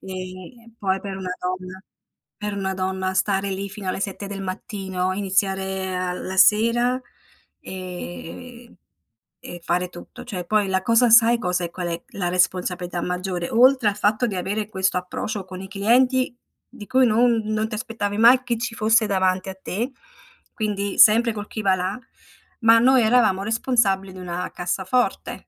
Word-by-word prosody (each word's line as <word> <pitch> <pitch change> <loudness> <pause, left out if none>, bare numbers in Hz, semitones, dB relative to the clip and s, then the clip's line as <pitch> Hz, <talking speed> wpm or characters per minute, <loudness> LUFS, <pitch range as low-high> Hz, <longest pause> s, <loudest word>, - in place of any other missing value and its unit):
e 185 +5 -9
poi 190 -1 0
per 195 -1 -6
una 185 -1 -5
donna 185 +1 -5 0.5
per 210 -1 -4
una 190 -1 -2
donna 190 0 -2
stare 195 +1 0
lì 195 +1 -4
fino 195 0 -8
alle 185 - -2
7 200 0 -4
del 195 0 -6
mattino, 190 -1 -3
iniziare 190 -1 -1
a 180 0 -2
la 185 +1 -5
sera 235 +6 +4 0.6
e 185 +6 -9 0.7
e 175 - -8
fare 180 +1 -1
tutto. 175 -1 -11
Cioè 190 -8 -6
poi 210 +1 +1
la 190 0 +1
cosa 230 +3 +3
sai, 230 +1 +6
cosa 180 -6 -1
è - - -6
qual 175 0 -5
è 170 0 -5
la 180 -3 -2
responsabilità 180 -1 0
maggiore? 180 -1 -3
Oltre 250 -1 +5
al 200 - -4
fatto 210 +3 +1
di 210 -5 -3
avere 205 +4 -3
questo 190 -2 0
approccio 195 +3 -4
con 185 0 -9
i 190 - -8
clienti 245 +6 +2 0.3
di 205 - -12
cui 260 0 +4
non 235 0 +3
non 215 0 -1
ti 220 - -4
aspettavi 215 -3 -3
mai 240 +3 +6
chi 240 -2 -1
ci 235 +1 -4
fosse 225 0 +3
davanti 190 -1 0
a 190 - -7
te, 230 +10 -3 0.6
quindi 205 -2 -3
sempre 230 +2 +6
col 210 0 -6
chi 220 - -5
va 195 -2 +3
là, 185 +5 -3 0.6
ma 225 0 +6
noi 255 +2 +5
eravamo 220 -4 +3
responsabili 210 -4 +1
di 185 - -10
una 180 0 -4
cassaforte. 190 +7 -2
195 Hz, 165 wpm, -23 LUFS, 185-225 Hz, 0.7 s, sai